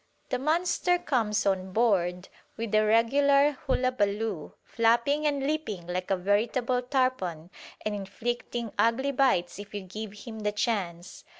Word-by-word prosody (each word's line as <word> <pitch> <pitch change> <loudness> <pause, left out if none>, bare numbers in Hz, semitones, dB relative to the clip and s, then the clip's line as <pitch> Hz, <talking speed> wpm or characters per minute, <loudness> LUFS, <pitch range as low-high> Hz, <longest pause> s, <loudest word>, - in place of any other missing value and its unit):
The 255 - -1
monster 350 +4 +1
comes 220 -9 0
on 190 -1 0
board 185 -6 +1 0.3
with 225 -2 -4
a 215 0 +5
regular 275 +6 +4 0.2
hullabaloo, 220 - 0
flapping 240 +6 +2
and 280 -2 0
leaping 280 - -2
like 180 +1 -3
a 195 - +2
veritable 235 +6 +1
tarpon 245 - -1 0.3
and 215 - 0
inflicting 230 +3 -4
ugly 260 +5 +2
bites 250 -10 +1
if 205 0 -9
you 205 - -3
give 205 +2 -7
him 220 +1 -9
the 210 -1 -1
chance. 185 -6 -3
225 Hz, 135 wpm, -28 LUFS, 195-255 Hz, 0.3 s, a